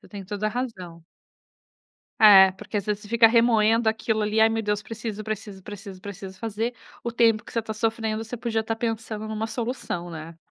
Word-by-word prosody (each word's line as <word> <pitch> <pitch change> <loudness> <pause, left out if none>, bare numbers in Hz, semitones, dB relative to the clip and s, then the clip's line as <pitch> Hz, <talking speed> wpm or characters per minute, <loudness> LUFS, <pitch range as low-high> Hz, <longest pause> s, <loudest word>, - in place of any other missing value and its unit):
Você - - -18
tem 200 -2 -8
toda 205 +2 -3
a - - 0
razão. 190 -9 -5 1.2
É, 195 -3 +9
porque 210 +2 -5
às 200 - -3
vezes, 210 -1 -2
você - - -11
fica 230 +1 +6
remoendo 225 -1 +4
aquilo 220 0 0
ali. 210 +1 +1
"Ai, 220 - +6
meu 225 0 -1
Deus! 210 0 0
Preciso, 220 -1 -6
preciso, 210 -2 -6
preciso, 200 -1 -9
preciso 195 -1 -8
fazer". 225 +2 -2 0.3
O 235 - -2
tempo 230 -2 +3
que - - -13
você 230 - +1
tá 220 0 -5
sofrendo, 220 0 -1
você 225 +2 -6
podia 230 -2 -1
estar 225 +1 -3
pensando 225 -1 -3
em - - -6
uma 220 +1 -2
solução, 225 -7 -4
né? 165 0 -8
220 Hz, 205 wpm, -25 LUFS, 205-225 Hz, 1.2 s, É